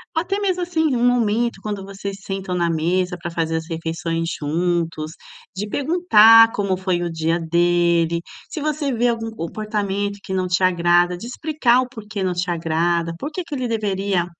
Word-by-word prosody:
ou 320 - +2
até 395 +3 -2
mesmo, 370 -3 0
assim, 320 -5 0
um 240 0 +1
momento 235 -2 +1
quando 205 -2 -4
vocês 195 0 -6
sentam 195 -2 -4
na 170 -1 +1
mesa 180 +3 0
pra 175 - -4
fazer 165 -1 -1
as 160 0 -5
refeições 165 0 -3
juntos, 165 0 -1 0.4
de 205 +3 -3
perguntar 225 - +6
como 200 -2 0
foi 185 -1 -1
o 170 - -3
dia 165 +1 0
dele, 170 0 +2 0.3
se - - -5
você 300 -1 -1
vê 240 0 +1
algum 225 -1 -2
comportamento 205 +1 -3
que 190 - -5
não 185 -1 0
te 180 +1 +1
agrada, 175 0 +3
de 225 - -8
explicar 255 -2 +1
o 255 - -3
porquê 215 -3 -6
não 185 -1 0
te 180 +1 -2
agrada, 165 0 0
porque 310 +5 -4
que 330 - -9
ele 255 -2 -2
deveria, 200 -5 0
190 Hz, 180 wpm, -21 LUFS, 170-230 Hz, 0.4 s, perguntar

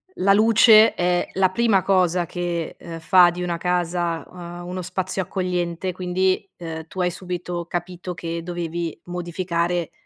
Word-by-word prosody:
la 195 +1 +3
luce 220 +1 +6
è 180 0 +1
la 190 -1 +3
prima 205 -2 +2
cosa 180 -2 +2
che, 170 -1 -3
ehm, 165 -1 -8
fa 175 +2 +6
di 175 +1 -5
una 175 -1 -2
casa, 175 -1 -1
uhm, 175 -1 -9
uno 185 +1 -4
spazio 185 +1 -2
accogliente, 180 -1 -2
quindi, 185 +2 -1
uhm, 160 -2 -7
tu 190 - -9
hai 180 0 +1
subito 180 -1 -5
capito 180 +1 -5
che 165 0 -4
dovevi 170 -1 -4
modificare, 175 -1 -2
180 Hz, 150 wpm, -22 LUFS, 170-185 Hz, -, luce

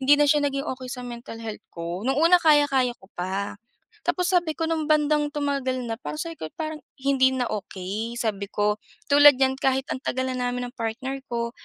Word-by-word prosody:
hindi 275 +2 +6
na 295 - +4
siya 295 0 +4
naging 275 +1 -3
okey 255 0 -8
sa 250 -1 -6
mental 235 -1 -8
health 220 -1 -6
ko. 170 +2 -5
No'ng 270 - +2
una, 345 +2 +6
kaya-kaya 280 -6 +4
ko - - -20
pa, 195 +3 -3 0.4
tapos 360 +1 0
sabi 345 -2 +3
ko 325 - -1
no'ng 320 -2 -1
bandang 300 -1 +3
tumagal 275 -4 -1
na, 225 - -2
parang 300 - -5
sabi 330 0 -4
ko, 155 - -5
parang 310 -1 -4 0.2
hindi 265 -1 +4
na 250 -2 0
okey 210 +3 -4
sabi 200 -3 -2
ko. 210 0 +1 0.3
Tulad 290 -1 +8
niyan, 265 0 +3
kahit 265 +1 +1
ang 260 - -4
tagal 260 +1 -1
na 255 - -2
namin 245 0 -1
ng 245 - -15
partner 260 +4 -3
ko 235 0 -2
260 Hz, 205 wpm, -25 LUFS, 235-290 Hz, 0.4 s, Tulad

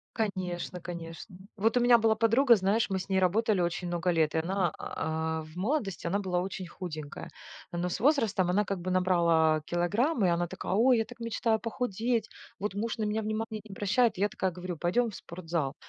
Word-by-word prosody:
Конечно 185 -5 -3
конечно. 170 +2 -8 0.2
Вот 225 +3 +2
у - - +5
меня 240 0 +6
была 220 -1 +3
подруга, 235 +3 +5
знаешь, 200 +4 +1
мы 190 -1 0
с 185 - -6
ней 190 -1 +2
работали 200 +2 +2
очень 175 +1 -1
много 175 +1 0
лет, 160 -2 +1
и - - +3
она, 180 0 0
а, 160 0 -3
в 155 +1 -14
молодости 205 0 -2
она 195 +4 +1
была 180 -3 -1
очень 185 0 -5
худенькая. 155 -5 -7 0.4
Но 175 0 -2
с - - -3
возрастом 225 - +2
она 205 +3 +2
как 195 -1 -3
бы 185 +1 -3
набрала 170 -4 +3
килограммы 205 - +1
и - - +3
она 175 0 +1
такая: 170 - -4
"Ой, 240 +5 +5
я 225 - +1
так 245 +1 -13
мечтаю 230 -1 0
похудеть, 230 0 -1 0.3
вот 205 0 -2
муж 215 +3 -2
на 220 - -2
меня 215 +1 0
внимания 215 0 -3
не 220 - -16
обращает", 205 +3 +1
я 200 +2 +2
такая 190 -2 -2
говорю: 180 0 -6
"Пойдем 220 +9 +1
в - - -10
спортзал!" 165 -5 -4
190 Hz, 200 wpm, -29 LUFS, 175-220 Hz, 0.4 s, меня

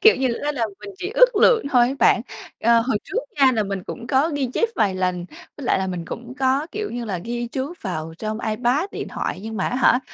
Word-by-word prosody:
kiểu 440 - +7
như 260 -1 +1 0.2
á, 295 - 0
là 235 -5 0
mình 205 -1 -8
chỉ 375 - -4
ước - - +6
lượng 450 - +4
thôi 245 -1 +5
á 270 - -2
bạn. 240 - +5 0.4
Ờ, 235 +1 +5
hồi 230 -2 0
trước - - -2 0.2
nha 265 -1 +7
là 220 - +1
mình 195 -2 -4
cũng 235 - -7
có 275 +4 +2
ghi 275 -2 0
chép 460 - +1
vài 200 -3 +2
lần, 180 -1 -1 0.3
với 285 - -8
lại - - +3
là 190 - -1
mình 180 -2 -4
cũng 240 +8 -7
có, 270 +3 +2
kiểu 425 0 -3
như 240 0 -4
là, 195 -5 -3
ghi 240 +6 -4
chú 265 +6 -4
vào 160 -5 -4
trong 215 0 -3
iPad, 245 - 0
điện - - -5
thoại, 185 - -3
nhưng 220 0 -5
mà 190 - 0
á 250 - -2
hả, 255 -1 +4
240 Hz, 255 wpm, -22 LUFS, 210-270 Hz, 0.4 s, kiểu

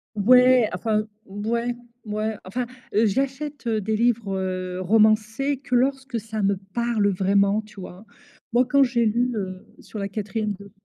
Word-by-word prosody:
Ouais, 250 +2 +5
enfin, 215 +3 0 0.2
ouais, 230 +4 -2 0.3
ouais, 215 0 -2
enfin, 240 +7 -3 0.3
heu, 220 +2 +4
j'achète, 270 +5 -2
heu, 220 -2 +1
des 215 +2 -1
livres, 225 -4 +1
heu, 185 -1 -3
romancés 220 +7 +2
que 250 -2 -4
lorsque 265 -1 0
ça 220 -1 -5
me 200 0 +2 0.2
parle 235 -3 +1
vraiment, 200 +2 +2
tu 210 -2 -13
vois? 185 +2 -10 0.5
Moi, 245 +2 +3
quand 280 +1 +4
j'ai 240 -3 +2
lu, 240 +3 +1
heu, 185 -2 -5
sur 215 - -9
la 200 -1 -3
quatrième 210 +1 -3
de 200 0 -12
220 Hz, 160 wpm, -24 LUFS, 200-245 Hz, 0.5 s, Ouais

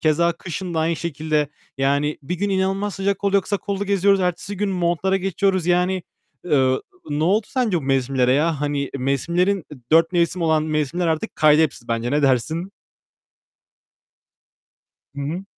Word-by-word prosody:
Keza 170 +2 +2
kışın 175 +1 -6
da 160 - +1
aynı 165 +1 0
şekilde 155 -2 -1 0.3
yani 140 +2 +1
bir 145 +6 -3
gün 200 +3 -2
inanılmaz 195 +1 0
sıcak 195 0 -1
oluyor, 200 -1 +3
kısa 200 - -1
kollu 200 0 -3
geziyoruz. 200 0 +3
Ertesi 180 +2 -2
gün 205 +1 -1
montlara 180 +1 +1
geçiyoruz. 190 -1 0
Yani, 180 +1 +1 0.4
eee, 135 -6 +3 0.4
ne 150 +2 0
oldu 205 +5 +2
sence 240 -8 0
bu - - -7
mevsimlere 135 -1 +1
ya? 150 +2 +1
Hani 145 -1 -1
mevsimlerin, 170 +8 0 0.3
dört 165 +2 +5
mevsim 175 0 +1
olan 160 -1 +2
mevsimler 155 +2 -1
artık 160 +6 -2
kaydı 155 0 +5
hepsi 140 -6 -3
bence. 115 +1 -1
Ne 145 +2 +1
dersin? 140 +8 0 2.4
Hı 140 - -4
hı. 160 +7 -4
170 Hz, 155 wpm, -22 LUFS, 145-190 Hz, 2.4 s, dört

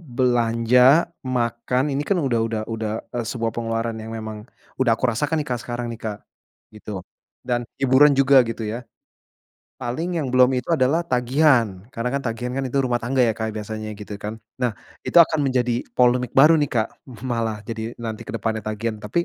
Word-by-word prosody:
belanja, 125 +3 +4 0.2
makan, 125 0 0
ini 145 +2 -1
kan 195 +2 +1
udah 125 -6 +1
udah 110 -1 -2
udah, 110 -1 -3 0.2
eee, 120 - -1
sebuah 115 -2 -2
pengeluaran 115 0 -2
yang 110 +1 -7
memang 110 -1 -6 0.4
udah 125 -3 +3
aku - - 0
rasakan 150 +7 0
nih 145 - -4
Kak 120 -1 -1
sekarang 120 0 -4
nih 115 - -8
Kak, 105 -2 -3 0.6
gitu. 105 0 -9 0.5
Dan 120 -1 -1 0.2
hiburan 135 +2 +6
juga 135 -1 +6
gitu 115 0 -4
ya. 115 +3 -4 1.0
Paling 165 +8 -2
yang 135 - -2
belum 125 +1 +5
itu 125 - -20
adalah 140 +6 +2
tagihan, 125 -6 +2
karena 115 -2 -3
kan 140 - 0
tagihan 125 0 -3
kan 135 +1 -2
itu 140 - -1
rumah 120 -2 0
tangga 125 +1 +2
ya 115 - +2
Kak 110 0 -3
biasanya 110 0 -5
gitu 105 -1 -8
kan. 105 +2 -5 0.2
Nah 120 -5 0 0.2
itu - - -4
akan 160 -2 +6
menjadi 125 -3 +1 0.2
polemik 125 -1 +2
baru 150 +5 +8
nih 145 - +1
Kak, 110 -2 0 0.4
malah, 115 -4 -2
jadi 115 +1 -5
nanti 110 -2 -5
ke - - -5
depannya 110 0 -2
tagihan, 110 +1 -4
tapi 145 +13 -1
120 Hz, 185 wpm, -22 LUFS, 115-130 Hz, 1.0 s, baru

